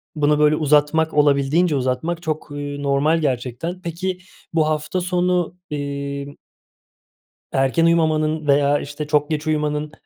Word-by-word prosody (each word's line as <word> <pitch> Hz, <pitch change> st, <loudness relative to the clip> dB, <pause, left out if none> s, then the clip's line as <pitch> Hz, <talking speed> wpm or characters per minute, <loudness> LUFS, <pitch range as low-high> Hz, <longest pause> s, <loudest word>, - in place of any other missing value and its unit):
bunu 150 Hz, 0 st, +2 dB
böyle 150 Hz, 0 st, +4 dB
uzatmak, 150 Hz, +1 st, +2 dB
olabildiğince 150 Hz, +3 st, +3 dB
uzatmak 135 Hz, +6 st, -1 dB
çok, 155 Hz, -1 st, -3 dB
eee, 145 Hz, 0 st, -5 dB
normal 140 Hz, +4 st, +2 dB
gerçekten. 135 Hz, +6 st, -3 dB
Peki 180 Hz, +2 st, -4 dB, 0.3 s
bu 155 Hz, -2 st, +2 dB
hafta 155 Hz, +4 st, -1 dB
sonu, 180 Hz, -1 st, 0 dB
iii 140 Hz, -1 st, -5 dB, 1.2 s
erken 135 Hz, +5 st, +2 dB
uyumamanın 155 Hz, -2 st, +1 dB
veya 145 Hz, 0 st, +3 dB
işte 145 Hz, +1 st, -6 dB
çok 150 Hz, 0 st, +1 dB
geç 155 Hz, 0 st, -2 dB
uyumanın, 150 Hz, -1 st, -1 dB
150 Hz, 125 wpm, -21 LUFS, 145-160 Hz, 1.2 s, böyle